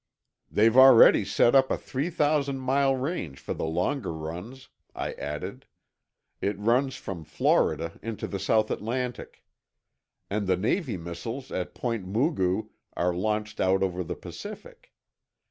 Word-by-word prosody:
"They've 110 +2 +3
already 130 -2 +8
set 120 - +3
up 135 -1 +5
a - - 0
three 140 +6 -3
thousand 145 -4 +1
mile 135 +1 +2
range 130 - -4
for - - -4
the - - -3
longer 90 - -1
runs," 90 +12 -7 0.3
I - - -3
added. 75 0 -6 0.7
"It 100 0 -1
runs 125 +6 +1
from 90 -5 -7
Florida 80 +1 +1
into 115 -1 -5
the 100 - -4
South 110 +3 +2
Atlantic. 125 +3 -4 0.8
And 100 0 -2
the 95 -1 +2
Navy 115 - -1
missiles 90 +10 -6
at 90 - -4
Point 115 -6 -3
Mugu 110 - 0 0.3
are 90 0 +1
launched 105 +3 -2
out 95 +1 +2
over 90 -1 -1
the - - -5
Pacific. - - -10
110 Hz, 140 wpm, -27 LUFS, 90-130 Hz, 0.8 s, already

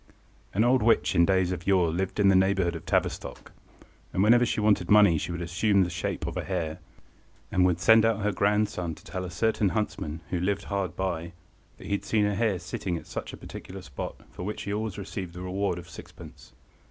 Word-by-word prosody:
An 105 - +2
old 125 +2 +4
witch 115 +1 +3
in 85 +1 +4
days 95 -2 +2
of 90 -1 -5
yore 90 -4 +3
lived 95 +4 -2
in 100 - +5
the 95 - +5
neighbourhood 95 -2 +2
of 80 - -9
Tavistock, - - -2 0.6
and 95 - +1
whenever 120 +3 +5
she - - -1
wanted 105 -4 +2
money 105 -5 +6
she - - -4
would 85 0 -4
assume 95 +3 +2
the 90 - -3
shape 85 - -3
of - - -4
a - - -2
hare, 85 -5 -3 0.7
and 90 0 +3
would 90 -1 0
send 110 +4 +6
out 110 -1 +2
her 105 - +2
grandson 100 -5 0
to - - -17
tell 95 - -5
a 90 - -5
certain 105 +2 +1
huntsman, 95 -6 -3
who 90 - 0
lived 100 +3 -1
hard 100 -2 -3
by, 85 -2 -3 0.4
that - - -12
he - - -6
had 100 - 0
seen 105 -2 +1
a 105 - 0
hare 105 -2 +1
sitting 90 0 -4
at - - -10
such - - -6
a - - -9
particular 95 0 -9
spot, 70 -6 -6 0.2
for - - -9
which 105 +4 -4
he 100 - -3
always 105 -1 -3
received 95 -3 -6
the 90 - -6
reward 95 0 -1
of 90 0 -9
sixpence. 90 - -13
95 Hz, 220 wpm, -27 LUFS, 90-105 Hz, 0.7 s, money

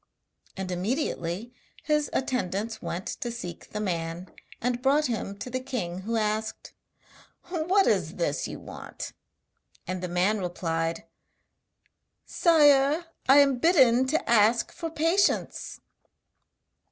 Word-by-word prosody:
And 190 -1 -4
immediately 195 - -2 0.3
his 300 -2 +1
attendants 220 -4 -2
went 180 +3 -4
to 240 - -4
seek 180 -8 -7
the 210 - -5
man, 175 -2 -3 0.3
and 245 0 -1
brought 285 +3 +3
him 215 -5 -3
to - - -7
the 255 - -1
king, 240 -10 -4
who 225 +5 -3
asked: 215 0 -2 0.8
'What 365 +3 +2
is - - +1
this - - -1
you - - -6
want?' - - -8 0.7
And 185 -1 -4
the 180 - -3
man 180 +5 +1
replied: 165 -2 -2 1.2
'Sire! 295 -1 +4 0.2
I 270 - +8
am 275 -3 +5
bidden 260 -6 +5
to 310 +4 0
ask 230 0 +4
for 330 -2 -5
patience.' 330 +5 0
235 Hz, 120 wpm, -27 LUFS, 185-285 Hz, 1.2 s, I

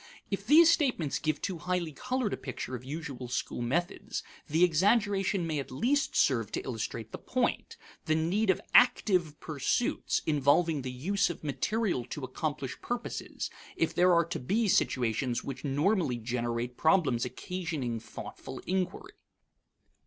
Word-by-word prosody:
If 200 +1 -3
these 325 +4 +8
statements 250 - +1
give 155 -1 -1
too 185 -4 -2
highly 180 -1 -1
colored 250 - -2
a - - +1
picture 130 -1 -6
of 125 -1 -5
usual 140 -3 -6
school 120 0 -3
methods, 160 +9 -2 0.2
the 160 +3 +3
exaggeration 195 +2 +3
may 155 -3 -1
at 135 - -5
least 255 - 0
serve 115 -6 +2
to - - -1
illustrate 115 -2 -4
the - - -6
point: 250 -1 -1 0.3
the 155 -2 +2
need 185 +7 +1
of 190 - +4
active 180 -10 +4
pursuits, 155 - 0
involving 150 +1 +3
the 130 - -4
use 190 +11 0
of 175 - -6
material 185 - 0
to 135 +3 -6
accomplish 135 0 -4
purposes, 245 0 -4 0.2
if - - 0
there 180 +1 +4
are 170 -1 +4
to 170 - -4
be 210 - +1
situations 120 - +1
which 130 -2 -6
normally 150 - +1
generate 120 +1 -3
problems 160 -8 +3
occasioning 140 -3 -3
thoughtful - - -8
inquiry. 185 0 -2
160 Hz, 145 wpm, -30 LUFS, 130-190 Hz, 0.3 s, these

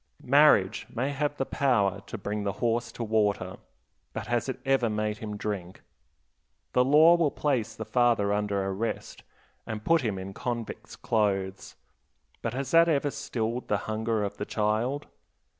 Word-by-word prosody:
Marriage 125 -8 +4
may 130 +4 -2
have 145 +1 -2
the 135 - -1
power 100 -10 +1
to - - -5
bring 105 +1 -3
the 100 -1 -1
horse 120 +1 -1
to 120 - -5
water, 105 -4 0 0.6
but - - -4
has 120 +2 -1
it 130 - -4
ever 135 -3 +2
made 105 0 -2
him 105 -2 -5
drink? 95 -4 -5 0.9
The 125 - +5
law 150 +5 +7
will 165 -3 +2
place 135 -7 -1
the 110 - -6
father 115 -5 +2
under 105 -1 0
arrest, 95 +4 -3 0.5
and 110 -1 -5
put 165 -1 +4
him 110 -6 -2
in 95 +1 -6
convict's 120 +1 -5
clothes; 95 -3 -1 0.7
but 115 +1 -3
has 135 0 -3
that 165 0 +6
ever 145 -2 +1
stilled 115 0 -3
the 105 - +1
hunger 110 0 -1
of 100 0 -4
the 105 - -3
child? 115 +7 0
110 Hz, 160 wpm, -28 LUFS, 105-130 Hz, 0.9 s, law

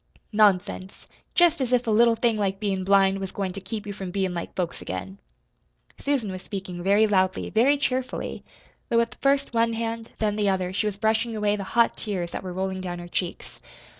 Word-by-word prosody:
"Nonsense! 195 -2 +1 0.3
Jest 340 -4 +4
as 255 -2 -1
if 250 -1 +3
a 225 - +1
little 230 +2 +5
thing 230 0 +2
like 195 -2 -1
bein' 195 -3 -1
blind 195 0 +4
was 195 -1 -4
goin' 190 -2 -3
to 195 - -7
keep 210 +3 -5
you 205 - -5
from 190 -2 -6
bein' 190 0 -1
like 170 - -5
folks 175 -2 -3
again!" 95 +1 -6 0.8
Susan 270 -8 0
was 185 0 -6
speaking 190 -3 -6
very 200 +4 +4
loudly, 190 -3 +1
very 260 +7 +4
cheerfully 255 -2 -2 0.5
though 235 - +2
with 230 +1 +2
first 275 -1 +2
one 230 0 +2
hand, 225 0 -3
then 210 -1 0
the 205 -1 +2
other, 185 -1 -1
she 210 +2 0
was 200 -2 -3
brushing 220 +2 +1
away 210 -1 +1
the 200 - -4
hot 235 - +5
tears 180 -5 -3
that - - -4
were 185 -1 -6
rolling 190 +1 -2
down 175 -1 -4
her 175 0 -8
cheeks. 175 0 -4
205 Hz, 205 wpm, -25 LUFS, 190-230 Hz, 0.8 s, little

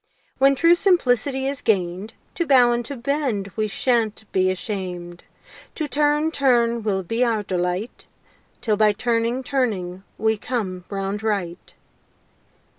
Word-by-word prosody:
When 275 +1 +5
true 335 +5 +5
simplicity 270 - +2
is 275 0 -3
gain'd, 190 0 -1 0.2
To 340 - -2
bow 250 -3 +6
and 240 0 0
to 280 - -5
bend 245 -6 -2
we 215 -1 0
shan't 220 -1 0
be 185 0 +2
asham'd, 180 -3 -5 0.5
To 310 - -2
turn, 295 +2 +1
turn 240 -5 +2
will 195 -3 -1
be 230 +7 0
our 225 -3 +1
delight 180 +3 -3 0.5
'Till 215 -3 +1
by 215 0 +4
turning, 235 +3 0
turning 205 -10 -2 0.2
we 220 0 +1
come 190 -8 -3
round 195 +1 -3
right. 195 -5 -3
225 Hz, 135 wpm, -22 LUFS, 195-265 Hz, 0.5 s, bow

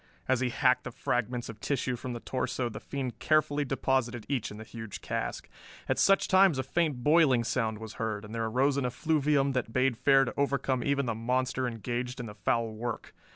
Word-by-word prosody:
As 130 -2 +2
he 130 -1 0
hacked 125 +1 +2
the - - -3
fragments 120 0 -2
of 110 -2 -9
tissue 130 -1 -1
from 125 +1 -5
the 120 - -5
torso 130 0 -2
the - - -7
fiend 135 -3 -5
carefully 150 -1 +2
deposited 130 -3 -1
each 135 -6 -1
in 105 - -9
the 110 - -8
huge 110 -2 -8
cask. - - -3 0.4
At - - 0
such 195 0 +4
times 190 -5 +5
a 130 - 0
faint 145 -2 -1
boiling 150 -5 +5
sound 115 -2 -1
was 110 0 -8
heard, 110 -2 -2
and 105 - -10
there 115 -1 -1
arose 135 +5 +2
an 140 - 0
effluvium 145 0 +1
that 125 -4 -2
bade 130 -1 +2
fair 135 +3 +4
to 120 - -4
overcome 135 -3 0
even 140 -1 +1
the 115 - -1
monster 125 +3 -1
engaged 120 +2 -4
in 120 - -4
the 105 - -8
foul 115 +2 0
work. 115 +1 -5
125 Hz, 205 wpm, -29 LUFS, 115-140 Hz, 0.4 s, times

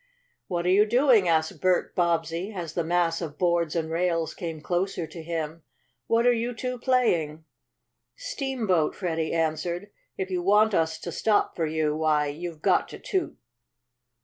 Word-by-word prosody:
"What 175 -2 -2
are 180 - +3
you 205 +3 +5
doing?" 240 -4 +4
asked 160 -1 +1
Bert 185 -1 +2
Bobbsey, 170 +2 0
as 175 -6 -6
the 170 - -1
mass 170 0 +1
of 155 -3 -6
boards 170 -3 +1
and 160 -1 -1
rails 165 -1 0
came 165 -3 -5
closer 175 +2 -1
to 160 +2 -9
him. 160 0 -4 0.5
"What 230 +1 +2
are 245 - +6
you 235 +1 -2
two 250 +2 -4
playing?" 170 - +1 0.7
"Steamboat," 265 - -1
Freddie 165 -4 -2
answered. 170 +4 -1 0.3
"If 190 0 -3
you 180 -1 0
want 210 +3 +4
us 160 -2 +1
to 175 - -5
stop 210 +4 +1
for 165 -2 0
you, 155 -1 0
why, 155 -2 +1
you've 160 +1 -7
got - - +3
to - - -8
toot." 375 -4 -2
175 Hz, 165 wpm, -26 LUFS, 160-205 Hz, 0.7 s, are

